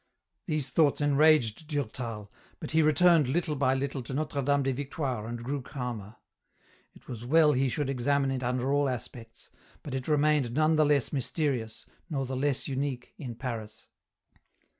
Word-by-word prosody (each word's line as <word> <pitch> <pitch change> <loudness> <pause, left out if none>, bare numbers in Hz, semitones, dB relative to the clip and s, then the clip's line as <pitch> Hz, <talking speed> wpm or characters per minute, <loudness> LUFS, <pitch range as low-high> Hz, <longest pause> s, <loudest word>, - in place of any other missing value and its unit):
These 155 -5 -1
thoughts 150 -4 +3
enraged 145 -3 +3
Durtal, 115 -7 -4 0.3
but 155 - -6
he 160 0 +4
returned 160 -1 +5
little 155 +2 0
by 135 -1 +2
little 135 0 -2
to 130 +2 -6
Notre 150 -1 -2
Dame 140 +1 +2
des 135 0 0
Victoires 130 -4 -3
and 120 0 -5
grew 140 +3 -3
calmer. 120 -6 -6 0.8
It - - -19
was 120 -2 -7
well 155 +4 +5
he 135 -1 +1
should 145 +2 -2
examine 135 +1 +1
it 130 -1 -2
under 125 +2 0
all 145 -1 +2
aspects, 120 -2 -7 0.3
but 140 - -6
it 130 -1 -3
remained 150 -5 +2
none 155 +3 +3
the 155 0 +4
less 145 -3 +1
mysterious 135 -5 -2 0.2
nor 135 -4 -1
the 130 +1 -4
less 140 0 0
unique 135 -2 -3
in 125 -5 -6
Paris. 115 -4 -6
135 Hz, 165 wpm, -29 LUFS, 125-150 Hz, 0.8 s, returned